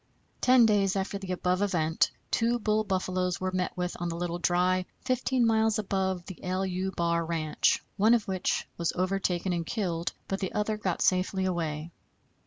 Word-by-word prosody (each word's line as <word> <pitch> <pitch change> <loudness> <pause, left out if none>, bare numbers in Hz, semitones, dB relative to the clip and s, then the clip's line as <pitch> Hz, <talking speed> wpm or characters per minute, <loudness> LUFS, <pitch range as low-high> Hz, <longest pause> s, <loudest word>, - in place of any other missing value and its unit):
Ten 250 -2 +6
days 200 -3 +3
after 195 +1 -2
the 190 -2 -6
above 180 +1 0
event 165 -5 +2 0.2
two 235 +1 +2
bull 215 -1 +1
buffaloes 185 -2 -1
were 185 0 -1
met 185 0 -2
with 180 0 -2
on 175 - -1
the 165 - -3
Little 175 0 -3
Dry, 180 +1 +2
15 255 -1 +1
miles 220 -1 +3
above 190 -3 -1
the 190 - -9
=LU= 185 0 -1
bar 170 -2 0
ranch, 160 -2 +1
one 220 +4 +5
of 225 - -1
which 190 -2 -1
was 170 - +1
overtaken 185 -1 0
and 170 -1 -1
killed, 170 -4 -2
but 195 - -2
the 190 - -3
other 210 +1 0
got 190 -5 -1
safely 185 +1 +2
away. 165 -3 -2
185 Hz, 175 wpm, -28 LUFS, 175-205 Hz, 0.2 s, Ten